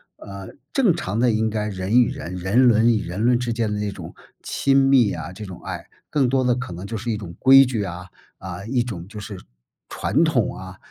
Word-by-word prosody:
呃， 100 -1 -10 0.2
正 230 - +3
常 100 +4 -3
的 125 +1 +3
应 110 0 +1
该 105 -1 -2
人 100 +3 +1
与 120 - +2
人 85 +4 -6
人 95 +7 +2
伦 115 0 +4
与 105 - -1
人 85 +3 -5
伦 125 0 +4
之 120 -1 -2
间 115 -1 -1
的 - - -2
那 105 0 -2
种， - - -10 0.3
亲 135 -1 +1
密 135 -5 +4
啊 90 - -6
这 105 - -9
种 95 -3 -10
爱， - - -6 0.2
更 135 -4 +1
多 130 +1 +2
的 125 -1 +3
可 125 -5 -5
能 90 +2 -7
就 115 - -5
是 115 +2 -3
一 110 - -2
种 90 -5 -9
规 135 +1 +7
矩 120 -5 -2
啊， 90 -1 -7 0.3
啊， 95 +1 -8
一 125 +2 0
种 95 -9 -6
就 105 0 -8
是， 100 -1 -7 0.6
传 165 - +1
统 145 - +1
啊， 95 0 -10
110 Hz, 250 characters per minute, -22 LUFS, 95-125 Hz, 0.6 s, 规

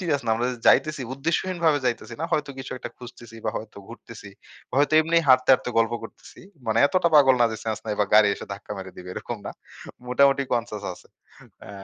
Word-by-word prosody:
Serious 155 -6 -1
না। - - +1
আমরা 120 +2 -1 0.2
যাইতেছি, 155 -3 +3
উদ্দেশ্যহীনভাবে 165 +1 0
যাইতেছি 120 -1 -3
না। - - -1
হয়তো 145 -2 0
কিছু 135 - -7
একটা - - -7
খুঁজতেছি 120 -2 -12
বা 110 - 0
হয়তো 110 -1 -8
ঘুরতেছি। 115 -2 -12 0.5
হয়তো 145 +2 +2
এমনি 165 +2 0
হাঁটতে, 130 0 +5
হাঁটতে, 125 - +1
গল্প 115 +1 +2
করতেছি। 115 - -13 0.3
মানে 110 +1 +1
এতটা 180 +2 +1
পাগল 135 -3 +7
না - - +6
যে - - -4
সেন্স 110 -2 -2
নাই 105 - -1
বা 105 - +4
গাড়ি 105 -1 +7
এসে - - -10
ধাক্কা 100 +1 -8
মেরে 95 -1 -8
দিবে। 90 - -10
এরকম 120 - -5
না - - -4 0.6
মোটামুটি 140 +2 +3
কনসিয়াস 110 -4 -2
আছে। - - -16 0.6
আ - - -12
125 Hz, 200 wpm, -24 LUFS, 110-145 Hz, 0.6 s, পাগল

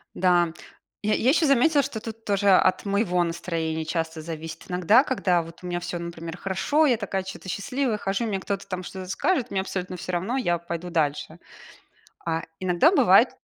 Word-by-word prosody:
Да, 175 -2 +3 0.5
я 215 - +2
я 245 - +2
ещё 315 +3 +4
заметила, 280 +2 +4
что 260 -6 -4
тут 225 0 -8
тоже 200 0 +2
от 185 +1 +4
моего 200 -3 +1
настроения 165 -2 -2
часто 160 0 -3
зависит. 160 0 -7
Иногда, 185 - +4
когда 185 - +1
вот 165 +1 -12
у 180 - -5
меня 175 0 -2
всё, 175 -1 -4
например, 170 0 -6
хорошо, 245 - +1
я 245 - +4
такая 200 -3 -2
чё-то 190 0 -8
счастливая, 250 +3 -1
хожу, 200 +3 -1
мне 200 -4 -1
кто-то 195 +1 -4
там 185 -1 -4
что-то 185 0 -8
скажет, 285 - 0
мне 195 - 0
абсолютно 185 -1 -4
всё 185 - -5
равно- 195 +10 -1
я 175 -9 +1
пойду 170 +1 -6
дальше. 160 0 -1 0.9
А 165 -1 0 0.2
иногда 185 - +4
бывает 380 - +5
185 Hz, 185 wpm, -25 LUFS, 170-215 Hz, 0.9 s, бывает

